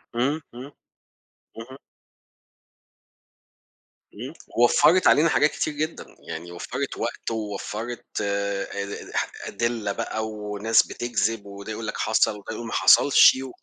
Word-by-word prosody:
إمم، 140 +6 0
إمم، 130 +4 -9 0.9
اهم. 125 +4 -9 2.4
إمم، 125 +8 -8 0.3
وفرت 155 +9 +5
علينا 160 +3 +5
حاجات 150 0 +3
كتير 155 - -2
جدًا، 155 +3 -4 0.2
يعني 85 +2 -7
وفرت 130 +10 -5
وقت 115 - -4
ووفرت 110 +2 -5 0.2
آآ، 100 -1 -2 0.8
أدلة 115 -3 -2
بَقى 110 +1 -3
وناس 105 +1 +1
بتكذب، 115 -3 -2
وده 100 +1 -8
يقول 110 0 -5
لك - - -4
حصل 110 0 +2
وده 105 +2 -8
يقول 115 +1 -6
ما - - -6
حصلش 140 - +6
و 135 - -7
115 Hz, 120 wpm, -24 LUFS, 105-130 Hz, 2.4 s, حصلش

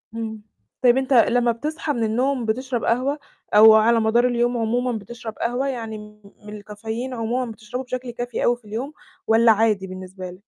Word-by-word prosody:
إمم. 220 -1 -5 0.4
طيب 250 0 +5
أنت 265 0 0
لمّا 240 0 +4
بتصحى 300 +5 -3
من 230 - -2
النوم 250 +3 0
بتشرب 245 +2 -2
قهوة 265 +5 0 0.4
أو 220 +1 +9
على 225 +2 +4
مدار 235 +3 +3
اليوم 240 0 0
عمومًا 245 +2 0
بتشرب 225 +2 -8
قهوة 245 +4 -1
يعني 225 -4 -4
م 210 0 -13 0.2
من 210 0 -8
الcaffeine 220 +5 -6
عمومًا 235 +1 -2
بتشربه 235 +4 -7
بشكل 255 -1 -5
كافي 240 +1 -4
أوي 240 0 +2
في 235 - -27
اليوم، 240 +8 -5 0.3
والّا 225 +1 +5
عادي 210 -3 +1
بالنسبة 185 0 -9
لك؟ 180 - -13
235 Hz, 180 wpm, -22 LUFS, 220-250 Hz, 0.4 s, أو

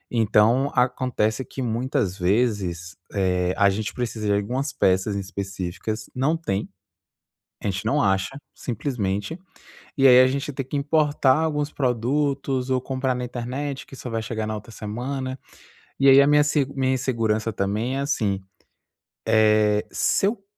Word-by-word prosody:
Então, 115 +5 +3
acontece 125 -2 +1
que 135 - -7
muitas 115 -5 -1
vezes, 95 -3 0 0.2
eh, 90 -2 +1
a 100 0 +5
gente 105 +2 -3
precisa 115 -3 -3
de 100 - +3
algumas 125 +8 -1
peças 95 +2 +1
específicas, 100 +2 -4
não 135 +6 +1
tem, 100 -12 -3 0.9
a - - -4
gente 100 +2 -4
não 110 - +2
acha, 95 +6 0 0.2
simplesmente. 115 - -3 0.6
E 135 -1 +6
aí 125 0 +8
a 130 - +6
gente 140 +3 -2
tem 135 0 -4
que 135 - -6
importar 145 -2 +2
alguns 150 -2 -1
produtos 135 +1 0
ou 130 -1 +2
comprar 130 0 -1
na 125 0 -4
internet 130 +3 -4
que - - -12
só 125 - -7
vai 115 -1 -2
chegar 110 -1 -3
na 110 - -2
outra 105 +2 -9
semana. 130 +5 -4 0.6
E 135 - +4
aí 135 +1 +8
a - - +4
minha 150 0 +5
seg 145 -2 +1
a - - -11
minha 130 -1 +1
insegurança 115 -4 0
também 105 +7 -1
é - - -1
assim, 110 -9 0 0.9
eh, 105 -1 +3
se - - +1
eu 200 -1 -2
120 Hz, 155 wpm, -24 LUFS, 105-135 Hz, 0.9 s, aí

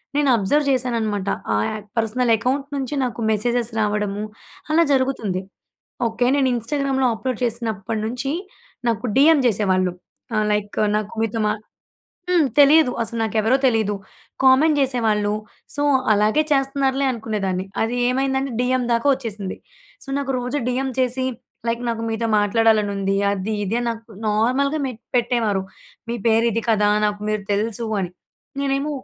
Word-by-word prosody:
నేను 290 -1 +3
అబ్జర్వ్ 285 +9 +1
చేశాననమాట, 225 -6 -1 0.2
ఆ - - +2 0.2
అక్ 210 - -12
పర్సనల్ 230 +2 +1
అకౌంట్ 265 +5 -1
నుంచి 275 +1 -3
నాకు 245 -2 -3
మెసేజెస్ 235 +2 0
రావడము 210 -1 -1 0.5
అలా 330 +2 +5
జరుగుతుంది. 260 -9 0 0.7
ఓకే, 230 +2 -1
నేను 275 -2 +2
ఇన్స్టాగ్రామ్‍లో 265 +2 0
అప్లోడ్ 255 0 -3
చేసినప్పట్నుంచి, 225 +2 -3 0.6
నాకు 230 +1 -1
డీఎం 295 +3 +6
చేసేవాళ్ళు. 185 -4 +1 0.4
ఆహ్, 215 0 +2
లైక్, 205 0 -3 0.2
"నాకు 215 -1 -4
మీతో 225 0 -2
మా" 210 - +2 0.8
హ్మ్. 350 -5 +4
తెలీదు, 290 -2 +6
అసలు 230 +1 -4
నాకెవరో 225 +3 +2
తెలీదు. 220 -5 +2 0.5
కామెంట్ 285 +4 +5
జేసేవాళ్ళు. 225 -6 +1 0.4
సో, 290 - -1 0.3
అలాగే 215 +8 +3
చేస్తున్నారులే 270 0 +1
అనుకునేదాన్ని. 205 -5 -2 0.2
అది 230 +2 -1
ఏమైందంటే, 265 +1 0
డీఎం 255 0 +1
దాకా 235 +3 +1
వొచ్చేసింది. 215 -7 -4 0.5
సో, - - -21
నాకు 275 -1 -2
రోజు 250 +4 -2
డీఎం 260 +2 -1
చేసి 255 0 +1 0.4
లైక్, 230 +1 -1
"నాకు 230 -1 -2
మీతో 225 +1 -1
మాట్లాడాలని 215 0 +3
ఉంది, 195 0 0 0.2
అది, 200 +2 -3
ఇది" 205 +4 -1
అని 240 - -2
నాకు 230 0 -8 0.2
నార్మల్‍గా 255 +8 +1
మె 255 - -3 0.2
పెట్టేవారు, 230 -5 +1 0.5
"మీ 235 - -1
పేరు 225 0 +4
ఇది 230 - -1
కదా! 210 -2 +3 0.2
నాకు 205 0 -3
మీరు 215 -1 -1
తెలుసు" 220 +2 -1
అని. 180 -1 -4 0.5
నేనేమో 275 +1 0
230 Hz, 140 wpm, -21 LUFS, 210-265 Hz, 0.8 s, డీఎం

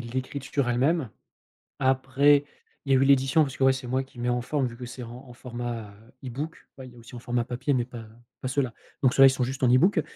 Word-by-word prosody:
l'écriture 130 +2 -3
elle-même, 135 +4 +1 0.7
après 135 +2 +3 0.4
il 135 - +2
y - - +6
a - - +5
eu 135 - +3
l'édition 135 +3 +4
parce 135 -2 -5
que, - - 0
ouais, 135 - +5
c'est 130 -1 -6
moi 130 +2 0
qui 130 -2 -15
met 120 +1 -1
en 120 0 0
forme 140 +2 -1
vu 120 -1 -6
que 125 - -7
c'est 125 +1 -8
en 120 +3 -10
en 125 - -12
format, 120 -3 -6
heu, 110 +5 -20
ebook. 140 +6 -6
Ouais, 130 -1 -9
il 125 - -14
y - - -18
a - - -16
aussi 115 +2 -14
en 120 - -7
format 120 0 -1
papier 125 +4 -2
mais 125 -2 +1
pas 120 -2 -9 0.3
pas - - -4
ceux-là 130 -2 -1 0.3
donc 130 - +4
ceux-là, 135 - +7
ils - - +7
sont 130 -1 -1
juste 130 +2 -4
en 125 - +5
ebook 135 +11 +4
130 Hz, 260 wpm, -26 LUFS, 120-135 Hz, 0.7 s, ceux-là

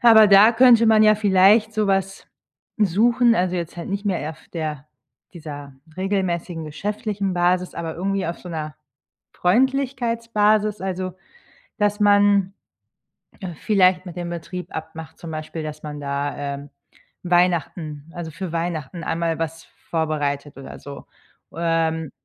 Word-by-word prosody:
aber 225 -3 +8
da 205 +3 +7
könnte 235 -1 +6
man 220 -1 +5
ja 215 0 +6
vielleicht 210 +2 +4
so 215 -1 +1
was 195 0 -1 0.5
suchen, 230 +5 +3
also, 180 -1 0
jetzt 170 0 -5
halt 170 - -6
nicht 200 +1 -3
mehr 170 -5 -1
auf 160 - -14
der 155 -3 -4 0.5
dieser 145 -5 -9 0.2
regelmäßigen 180 -4 -2
geschäftlichen 200 +4 -3
Basis, 180 +1 +1
aber 165 -1 -4
irgendwie 195 +1 -2
auf 170 - -4
so 180 - -11
'ner 155 -2 -5 0.6
Freundlichkeitsbasis, 230 -2 +1
also, 185 -1 -3 0.7
dass 205 0 +1
man 205 -1 +4 1.0
vielleicht 185 -2 +3
mit 175 0 -9
dem 175 -1 -4
Betrieb 180 +2 -7
abmacht 160 0 -8
zum 165 - -8
Beispiel, 155 +1 -5
dass 155 0 -7
man 150 -1 -6
da, 140 0 -3
ähm, 140 0 -5 0.5
Weihnachten 170 -3 0
also, 170 -2 -6
für 170 +1 -6
Weihnachten 165 -1 -3
einmal 165 0 -1
was 165 0 -4 0.3
vorbereitet 145 -3 -2
oder 135 - -9
so. 140 -1 -10 0.5
Ähm, 165 -2 0
180 Hz, 135 wpm, -22 LUFS, 160-205 Hz, 1.0 s, aber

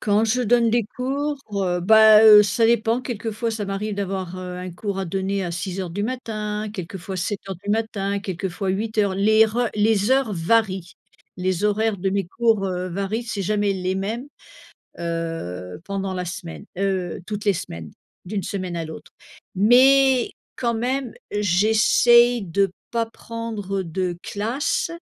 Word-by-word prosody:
Quand 210 +1 +2
je 250 +3 +1
donne 235 0 +3
des 235 0 +2
cours, 280 +3 -2
heu, 180 -3 0
bah 220 +2 +7
heu, 210 -1 +10
ça 215 +3 +2
dépend. 230 +1 +2
Quelquefois 230 -2 -3
ça 215 -2 -3
m'arrive 200 +2 -3
d'avoir, 190 -2 -4
heu, 180 -1 -6
un 180 0 -6
cours 195 +2 -4
à 190 - -1
donner 195 +2 -2
à 170 - -4
6:00 180 0 -4
du 205 +4 -3
matin, 215 -3 -3
quelquefois 190 -1 -6
7:00 195 0 -4
du 205 - -2
matin, 205 -2 -1
quelquefois 190 0 -4
8:00. 210 0 0
Les 215 +3 +5
reu 235 +2 0
les 210 +1 +2
heures 265 -5 +2
varient. 190 0 0 0.4
Les 185 +1 -1
horaires 210 0 +1
de 190 +1 -1
mes 195 -2 -1
cours, 225 0 +1
heu, 180 0 -3
varient, 200 +5 -2
c'est 210 -4 -3
jamais 205 +1 +1
les 185 0 -2
mêmes, 220 +7 -3 0.7
heu 165 - -4
pendant 195 -1 -3
la 180 0 -3
semaine, 175 -1 -7
heu, 190 -3 -1
toutes 210 0 -5
les 200 - +4
semaines 80 - -7 0.3
d'une 195 +2 -3
semaine 185 -3 -4
à 165 - -3
l'autre, 160 0 -10 0.4
mais 255 +4 +5 0.3
quand 235 -2 0
même, 255 +3 -2 0.2
j'essaye 220 +4 +4
de 195 +2 +1 0.2
pas 230 -1 0
prendre 225 -4 -5
de 175 +1 -3
classe 255 - -2
205 Hz, 160 wpm, -22 LUFS, 185-225 Hz, 0.7 s, heu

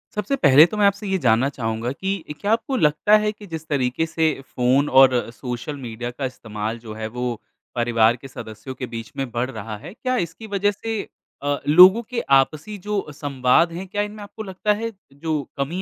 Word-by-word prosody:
सबसे 210 +6 0
पहले 150 - +7
तो 210 +5 -5
मैं 205 - +4
आपसे 200 +1 -1
ये 190 0 +1
जानना 125 -2 +3
चाहूँगा 115 -2 -3
कि 190 +1 -4
क्या 205 - 0
आपको 230 +4 -1
लगता 150 +5 +4
है 210 0 0
कि 210 0 -13
जिस 160 -2 -7
तरीके 135 0 0
से 160 -1 +1
फ़ोन 130 +4 +2
और 130 -3 +5
सोशल 125 +4 -5
मीडिया 120 -2 -5
का 135 +2 -4
इस्तेमाल 110 -2 -5
जो 110 -2 -9
है, 110 0 -5
वो 120 0 -4 0.3
परिवार 120 -1 +3
के 135 +3 -11
सदस्यों 120 0 -9
के 125 - -5
बीच 115 -1 -7
में 135 -2 -2
बढ़ 120 +2 -1
रहा 110 -2 -6
है, 160 - -10
क्या 255 +2 -2
इसकी 175 +3 -4
वज़ह 205 0 +1
से 220 +1 -4 0.4
अ, 145 0 0
लोगों 180 +8 +8
के 245 -2 -2 0.2
आपसी 155 +10 -2
जो 210 -1 -1
संवाद 140 +3 +2
हैं, 185 +3 -6
क्या 205 +2 -2
इनमें 210 +1 -5
आपको 210 +2 -8
लगता 195 +1 0
है 225 +2 -3 0.2
जो 155 +1 -2 0.2
कमी 155 +7 -2
145 Hz, 200 wpm, -22 LUFS, 125-200 Hz, 0.4 s, लोगों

